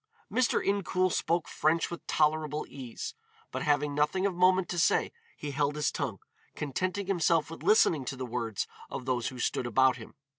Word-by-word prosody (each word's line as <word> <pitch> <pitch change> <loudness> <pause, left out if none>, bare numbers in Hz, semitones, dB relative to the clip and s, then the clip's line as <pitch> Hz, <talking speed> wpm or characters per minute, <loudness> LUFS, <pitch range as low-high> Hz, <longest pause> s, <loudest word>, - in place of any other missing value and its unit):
Mr. 255 -2 +2
Incoul 185 -2 +1
spoke 170 -1 0
French 160 +3 +1
with 170 - -8
tolerable 155 -1 +1
ease, 125 -4 -7 0.4
but - - -3
having 145 0 +1
nothing 150 +6 +1
of 200 - +1
moment 185 +1 +4
to 175 - -1
say, - - +3 0.3
he 150 - -5
held 145 +1 0
his 150 - 0
tongue, - - -3 0.4
contenting 185 +7 -2
himself 170 -4 +2
with 165 - -8
listening 165 -9 +4
to 135 - -3
the 130 -1 -4
words 115 -4 -2 0.2
of 125 - -6
those 125 -2 0
who 130 - -6
stood 120 0 -1
about 130 +2 +4
him. 110 - -12
150 Hz, 180 wpm, -30 LUFS, 130-180 Hz, 0.4 s, moment